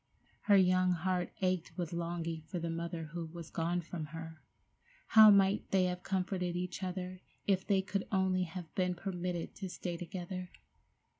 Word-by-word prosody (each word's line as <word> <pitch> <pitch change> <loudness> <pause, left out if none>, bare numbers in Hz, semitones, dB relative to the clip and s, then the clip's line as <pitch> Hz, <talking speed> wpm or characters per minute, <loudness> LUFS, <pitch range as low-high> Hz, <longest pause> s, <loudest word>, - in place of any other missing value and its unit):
Her 205 -1 +7
young 185 -1 +4
heart 180 +1 -1
ached 185 -2 0
with 175 -2 -3
longing 170 -1 -3
for 180 - -4
the 170 -1 -2
mother 165 -1 -4
who 170 -1 -3
was 165 0 -9
gone 170 +2 0
from 165 -1 -5
her. 160 +1 -8 0.7
How 220 -1 +10
might 200 0 +4
they 190 -1 +3
have 180 0 -1
comforted 180 -2 -1
each 180 +1 -3
other 185 0 -4 0.2
if 190 -2 +1
they 195 -2 +3
could 195 0 -2
only 190 -2 +2
have 170 -1 -8
been 180 -1 +1
permitted 180 -2 -3
to 190 -2 -5
stay 175 -1 -4
together! 180 +1 -5
180 Hz, 165 wpm, -34 LUFS, 170-185 Hz, 0.7 s, How